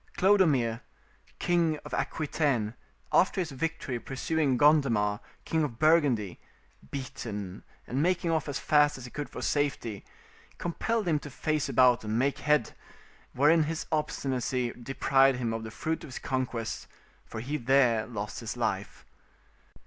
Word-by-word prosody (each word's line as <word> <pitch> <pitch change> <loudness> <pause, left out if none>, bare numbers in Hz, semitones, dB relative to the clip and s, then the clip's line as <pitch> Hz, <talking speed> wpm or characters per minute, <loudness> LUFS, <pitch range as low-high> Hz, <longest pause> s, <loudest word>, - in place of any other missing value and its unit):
Clodomir, 150 - +3 0.6
king 170 -3 +1
of - - -9
Aquitaine, 140 -8 0 0.4
after 190 +1 +4
his 170 -4 -2
victory 135 -3 -3
pursuing 135 +1 0
Gondemar, 120 -9 +3 0.3
king 160 -1 +1
of 125 -6 -3
Burgundy, 145 - +3 0.5
beaten 105 -7 -6 0.2
and 130 +4 -1
making 175 0 +1
off 160 -2 0
as 140 - -2
fast 150 -1 +3
as 130 - -9
he 125 - -10
could 145 -3 -5
for - - -7
safety, 125 -8 -1 0.5
compelled 215 +5 -1
him 155 -3 +2
to 145 - -9
face 150 +1 -1
about 125 -2 +4
and 110 +1 -1
make 135 +3 +1
head, 150 -6 +2 0.6
wherein 150 +5 +5
his 160 +1 -3
obstinacy 130 -5 -1
deprived 135 +1 +2
him 115 -3 -2
of 115 0 -4
the 110 - -6
fruit 160 +9 -3
of - - -8
his 130 - -7
conquest, 125 -4 -3 0.4
for 110 - -7
he 140 +6 -3
there 125 -4 +3
lost 105 -3 -5
his - - -5
life. - - -3
135 Hz, 145 wpm, -29 LUFS, 120-155 Hz, 0.6 s, wherein